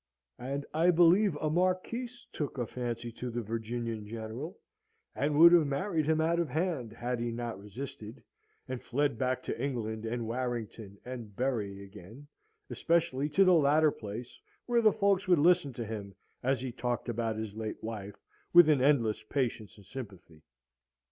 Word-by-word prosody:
And 140 +3 -4
I 165 +3 +3
believe 175 +2 +5
a 150 +1 -1
Marquise 185 +8 -1
took 145 -3 -4
a 120 - -1
fancy 120 0 -4
to 125 +2 -6
the 120 0 -3
Virginian 115 0 -4
General, 115 - -6 0.6
and 145 +1 0
would 170 +2 +9
have 170 -4 +5
married 155 +2 -1
him 160 0 +2
out 165 +2 +2
of 170 - 0
hand, 155 - -1
had 120 +2 -3
he 120 0 -2
not 115 -4 -4
resisted, 110 +1 -8 0.4
and 130 -1 -4
fled 140 -2 0
back 130 -1 0
to - - -4
England 110 -5 -3
and 115 0 -2
Warrington 115 -4 -4
and 120 -5 -7
Bury 105 -6 -2
again, 105 +7 -12 0.5
especially 150 -4 +1
to 195 +6 +4
the 185 - +6
latter 155 -1 +4
place, 110 +2 -8 0.3
where 240 -1 +2
the 215 -1 +6
folks 200 -2 +1
would 180 -2 +5
listen 170 -1 +4
to 120 -1 -5
him 100 -3 -6 0.3
as 130 -1 0
he 130 -1 -4
talked 125 0 -3
about 115 -1 -1
his 110 -2 -5
late 110 -1 -5
wife, 105 -3 -6 0.4
with 175 -2 +9
an 145 -4 +4
endless 125 -6 +3
patience 110 -3 -3
and 100 - -16
sympathy. 95 -11 -10
125 Hz, 170 wpm, -31 LUFS, 110-155 Hz, 0.6 s, would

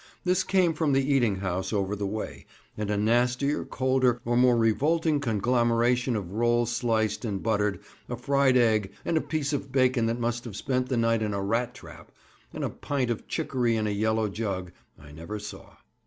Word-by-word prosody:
This 185 0 +2
came 185 -4 +2
from 155 -3 0
the 135 +1 +2
eating 120 -7 +2
house 95 0 -3
over 100 -1 -1
the 100 -1 -3
way, 105 +2 -6 0.3
and 105 -1 -3
a 105 - 0
nastier, 125 +6 +1
colder, 130 -2 +1
or 120 +1 0
more 125 0 +5
revolting 150 +7 +2
conglomeration 120 +1 +1
of 95 -4 -4
roll 120 +2 +2
sliced 115 -2 0
and 100 -5 -3
buttered, 105 -4 0 0.3
a 120 - -3
fried 135 0 +3
egg, 110 -5 +2
and 170 - 0
a 160 - +3
piece 155 -2 -2
of 140 -1 -3
bacon 130 -3 +2
that 115 +1 -1
must 120 0 -1
have 110 -5 -7
spent 130 +2 -1
the 130 - 0
night 115 -1 +2
in 105 -2 -1
a 100 - -2
rat 115 +4 -1
trap, - - -13 0.4
and - - -5
a - - 0
pint 130 -4 -2
of 115 - -5
chicory 125 -7 0
in 110 -1 0
a 105 - 0
yellow 110 +1 +1
jug, 95 -4 -4 0.3
I 75 0 -14
never 85 +8 -7
saw. 105 0 -10
120 Hz, 195 wpm, -27 LUFS, 105-130 Hz, 0.4 s, more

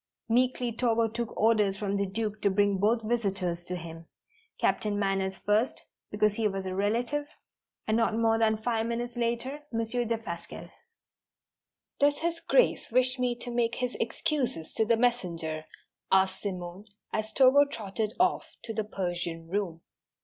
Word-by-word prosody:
Meekly 245 +1 +2
Togo 230 -1 +2
took 230 +1 -5
orders 210 -3 +3
from 200 -1 -1
the 200 0 0
Duke 215 +2 -3
to 200 - +3
bring 200 0 +2
both 225 +3 +2
visitors 195 -7 -1
to 180 - -4
him, 165 -1 -8 0.5
Captain 210 -1 +1
Manners 195 -1 0
first, 215 +5 +1 0.3
because 210 0 +2
he 220 0 +1
was 195 -1 -3
a 185 - -3
relative, 235 +9 0 0.6
and 220 +1 +2
not 225 -1 +2
more 225 -1 +3
than 220 -1 +3
five 225 0 -1
minutes 240 +1 -3
later, 240 +4 -2
Monsieur 230 +1 -1
Defasquelle. 225 -7 -5 1.3
"Does 285 0 +4
His 335 +1 -1
Grace - - +2
wish 255 +2 +3
me 250 -1 +1
to 240 0 -7
make 235 -1 +1
his 250 -1 -2
excuses 235 - -1
to 220 - +2
the 230 +1 +3
messenger?" 170 -10 0 0.5
asked 190 0 +3
Simone, 185 0 -5 0.3
as 215 0 -1
Togo 265 +4 +6
trotted 215 -4 -3
off 365 +1 +1
to 225 - -4
the 220 - -1
Persian 175 -4 -3
room. 180 -4 -2
220 Hz, 155 wpm, -29 LUFS, 195-240 Hz, 1.3 s, Togo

